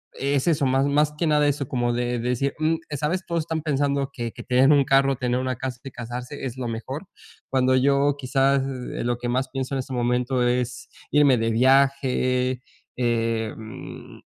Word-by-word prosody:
es 140 +1 0
eso 145 -5 +2
más, 135 +1 +2
más 145 +1 +2
que 170 - 0
nada 150 -2 +3
eso 140 -2 -1
como 120 -2 0
de 120 0 -1
decir, 125 +3 -1
mm, 155 +1 +2
eh, 145 - -4
¿sabes?, 170 +7 -1
todos 170 -1 0
están 160 0 -3
pensando 140 -2 0
que 115 -2 -4
que - - -10
tener 130 +3 +4
un 145 -2 +5
carro, 135 0 +3
tener 125 0 -1
una 130 -1 -2
casa 125 -1 -5
y 135 - -6
casarse 125 +4 -6
es 125 -1 -4
lo 125 -2 -3
mejor. 130 - -5 0.4
Cuando 130 -1 +2
yo, 140 +2 +3
quizás, 135 0 +2
eh, 130 -2 -5
lo 120 0 0
que 120 - -4
más 130 +2 -1
pienso 135 0 -4
en 135 - -1
este 130 +1 -6
momento 125 +1 0
es 125 0 -2 0.2
irme 145 -4 +5
de 115 0 0
viaje, 130 0 +2 0.3
em, 115 -2 -3
130 Hz, 190 wpm, -24 LUFS, 125-140 Hz, 0.4 s, un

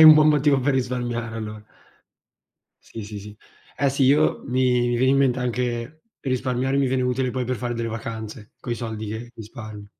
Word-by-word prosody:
hai 160 - +11
un 155 -1 +12
buon 155 0 +6
motivo 145 -2 +4
per 135 +1 +2
risparmiare 120 -3 -2
allora. 110 -1 -6 1.2
Sì 110 -2 -8
sì 105 -1 -7
sì. 105 +1 -11 0.4
Eh 140 - +2
sì, 135 +1 0
io 145 +4 +4
mi 125 -1 +2
mi 120 - +1
viene 130 +2 +4
in - - +4
mente 130 -2 +3
anche 125 +4 -2 0.2
risparmiare 130 0 0
mi 135 -2 +3
viene 130 0 +1
utile 125 0 0
poi 130 0 -2
per 130 +1 -1
fare 120 0 -3
delle 115 0 -2
vacanze, 110 -1 -6
coi 120 - -3
soldi 110 -2 -5
che 110 +3 -5
risparmio. 110 -2 -9
125 Hz, 190 wpm, -24 LUFS, 115-130 Hz, 1.2 s, un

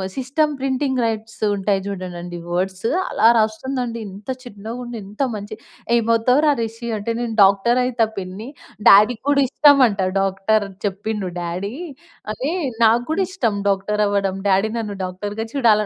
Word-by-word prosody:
System 290 +4 0
printing 265 -1 0
rights 220 0 -4
ఉంటాయి 195 0 0
జూడండండి 175 -3 -6 0.2
words 190 +4 -1 0.2
అలా - - +3
రాస్తుందండి. 235 +2 -1
ఇంత 200 +5 -12
చిన్నగుండి, 240 +1 -7
ఇంత 210 +6 -7
మంచి 205 +1 -7 0.4
ఏమవుతావురా 235 +6 +3
రిషి 230 +1 -5
అంటే, 210 +3 -3
నేను 230 -2 -3
డాక్టరయితా 235 +4 +3
పిన్ని. 195 +5 -6 0.4
డ్యాడీకి 215 +4 +6
గూడా 280 -1 +4
ఇష్టమంట 260 -10 +5 0.2
డాక్టర్, 195 +2 +1 0.2
చెప్పిండు 200 0 -3
డ్యాడీ 180 +6 -4 0.6
అదే, 265 +8 -3 0.3
నాకు 230 +2 +4
గూడా 380 +5 +1
ఇష్టం 240 - -1
డాక్టరవ్వడం. 200 -1 0
డ్యాడీ 195 +3 +2
నన్ను 210 -3 -4
డాక్టర్‌గా 205 +4 -5
చూడాల్ 220 -6 +4
220 Hz, 125 wpm, -20 LUFS, 195-245 Hz, 0.6 s, డ్యాడీకి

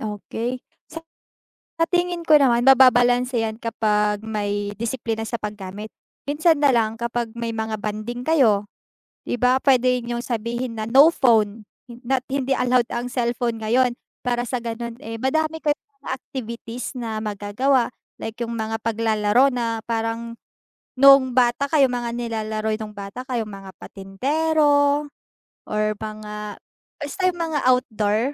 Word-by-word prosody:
okey. 225 +4 -4 0.3
Sa 325 0 -8 0.8
sa 330 - +4
tingin 350 -1 0
ko 310 - +7
naman 245 -3 +3
mababalanse 245 -1 +5
'yan 220 -1 -2
kapag 210 -2 0
may 205 -2 -3
disiplina 225 -1 -3
sa 230 +1 -4
paggamit, 210 0 -6 0.4
minsan 315 +1 +3
na 285 -2 +5
lang 225 0 0
kapag 235 -1 -2
may 230 -1 -3
mga 220 -1 -3
bonding 215 +4 -4
kayo, 225 -11 +3 0.6
'di 245 - -1
ba, 250 +2 +3
puwede 255 -2 +3
niyong 240 0 -4
sabihin 235 0 -3
na, 215 - -4
no 285 +7 +7
phone, 220 -5 +2 0.2
hin 240 -1 -13
not 260 +1 0
hindi 270 -1 0
allowed 250 -1 +2
ang 245 +1 -4
cellphone 235 -2 -1
ngayon, 245 +3 +2 0.3
para 240 -1 0
sa 250 - -1
gano'n, 235 0 -5
eh, 225 0 -6
madami 315 +4 0
kayong 295 -1 -1 0.2
mga - - -8
activities 240 0 -7
na 220 -2 -4
magagawa, 225 +5 0 0.2
like 225 - -6
'yung 235 0 -3
mga 220 0 -3
paglalaro 225 +3 +2
na 230 -2 -1
parang 230 0 -3 0.6
no'ng 270 -1 +6
bata 250 +3 +2
kayo 275 -5 +3
mga 240 -1 -2
nilalaro 220 -2 -2
niyo 215 - -3
no'ng 210 - -15
bata 200 +5 -7
kayo, 240 -3 -1
mga 195 -2 -10
patintero 285 +7 +1 0.7
or 215 0 0
mga 210 -1 -7 0.4
basta 290 +6 -6
mga 330 -4 -2
outdoor, 220 -4 +2
235 Hz, 145 wpm, -22 LUFS, 220-260 Hz, 0.8 s, ko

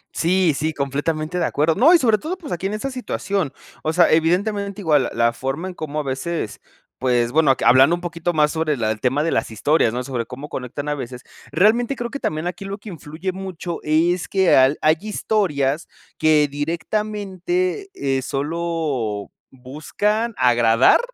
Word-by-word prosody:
Sí, 180 -1 +2
sí, 155 +2 -1
completamente 155 +5 -2
de 170 - +1
acuerdo. 155 +3 +1
No, 260 - +5
y 355 - +8
sobre 225 -8 +2
todo, 360 +4 -4
pues, 320 -6 -6
aquí 175 +2 -2
en 205 - -4
esa 270 +6 -4
situación. 200 - -2 0.3
O 155 - -1
sea, 175 0 +4
evidentemente, 200 +5 +1
igual 150 -6 +3
l - - -2
la 115 0 +2
forma 135 +9 -4
en 185 - -6
cómo 155 -2 -4
a - - -2
veces, 135 -2 -4 0.4
pues, 120 -2 +1
bueno, 145 -4 +3
que - - -3
hablando 130 +7 +6
un 175 - -9
poquito 175 0 -2
más 150 -2 +2
sobre 160 -3 -1
la 110 -2 0
el 110 - -4
tema 135 +4 +1
de 165 - 0
las 115 - 0
historias, 120 +2 +2
¿no?, 125 +2 -3
sobre 125 -3 -4
cómo 135 +4 -8
conectan 135 +3 -5
a 150 - 0
veces, 125 -2 -7 0.3
realmente 235 +7 +3
creo 240 -1 -5
que 280 - -5
también 155 +2 -2
aquí 180 +2 -4
lo 195 +1 -5
que 210 +1 -11
influye 165 +1 -5
mucho 185 -2 -6
es 165 +3 +1
que 190 -2 +3
al 130 +3 +5
hay 155 +1 +4
historias 170 -9 -1 0.3
que 155 -2 +4
directamente, 210 - -2
eh, 135 -1 -1
solo 145 -7 -2 0.2
buscan 200 - -2
agradar, 120 -1 +4
160 Hz, 185 wpm, -21 LUFS, 135-190 Hz, 0.4 s, y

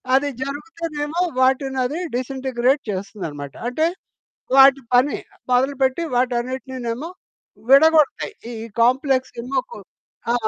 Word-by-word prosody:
అది 285 +2 +2
జరుగుతేనేమో 300 +2 -4 0.2
వాటినది 265 +2 +1 0.2
డిసెంటిగ్రేడ్ 260 +1 0
చేస్తదన్నమాట. 185 -8 -5 0.2
అంటే 310 +6 0 0.7
వాటి 275 0 +7
పని 255 +3 +4 0.4
మొదలుపెట్టి 265 +4 +1
వాటన్నిటినేమో 255 +2 -2 0.6
విడగొడతాయి. 315 +7 +5 0.2
ఈ - - -6 0.3
కాంప్లెక్స్ 260 +2 +2
ఏమో 255 +3 -1
కొ - - -8 0.5
ఆ! - - +2
265 Hz, 90 wpm, -21 LUFS, 250-285 Hz, 0.7 s, వాటి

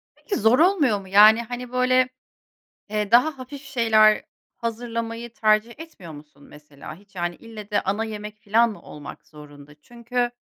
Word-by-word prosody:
Peki, 410 - -5
zor 220 +4 +3
olmuyor 315 - +3
mu? 190 - -14
Yani, 210 +4 +6
hani, 245 +1 -7
böyle, 255 0 +2 0.8
eee, 210 -1 -2
daha 270 +5 +3
hafif 270 +2 -9
şeyler 220 -5 +3 0.3
hazırlamayı 230 0 -5
tercih 220 -2 +1
etmiyor 265 - -11
musun 145 -1 -15
mesela? 150 -1 -13
Hiç, 200 +2 -23
yani, 175 0 -2
ille 220 -2 -11
de 205 - +1
ana 205 +4 -1
yemek 210 -1 -8
filan 225 +3 +2
mı 210 - -11
olmak 150 -1 -11
zorunda? 145 -1 -15
Çünkü, 240 +2 -3
220 Hz, 155 wpm, -23 LUFS, 200-245 Hz, 0.8 s, Yani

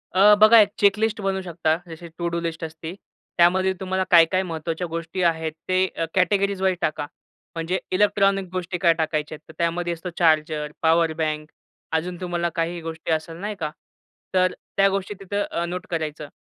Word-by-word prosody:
अ, 205 +3 +7
बघा 220 +2 +9
एक 205 -2 +5
चेकलिस्ट 210 +2 +2
बनू 195 -1 -1
शकता. 165 -3 0
जशी 165 +1 -9
टु 170 - -2
डू - - 0
लिस्ट 165 -1 -4
असते. 160 +1 -6 0.4
त्यामध्ये 185 +2 +4
तुम्हाला 190 0 -1
काय, 170 -2 +8
काय 185 0 +2
महत्वाच्या 165 0 -4
गोष्टी 165 +2 -4
आहेत? 160 -2 +1 0.2
ते 185 0 +3
अ, 165 - 0
कॅटेगरीजवाईज 190 0 +1
टाका. 150 -1 -1 0.5
म्हणजे 165 +3 -1
इलेक्ट्रॉनिक 195 0 +2
गोष्टी 185 0 -3
काय 170 -1 +4
टाकायच्या 155 -2 -2
आहेत? 150 - -15
तर - - -11
त्यामध्ये 170 +1 0
असतो 170 +2 -6
चार्जर, 155 -2 +2
पॉवर 165 0 +3
बँक 155 -1 -2 0.5
अजून 175 +2 -4
तुम्हाला 175 -1 -1
काही 170 +1 -2
गोष्टी 165 0 -5
असेल 160 +1 -2
नाही 205 +4 -4
का? 155 -3 -2 0.6
तर 185 0 +3 0.3
त्या 195 0 +5
गोष्टी 195 +1 -2
तिथं 200 +1 -2
अ, 170 - -1
नोट 180 +1 -5
करायचं. 155 -3 -3
175 Hz, 175 wpm, -23 LUFS, 160-190 Hz, 0.6 s, बघा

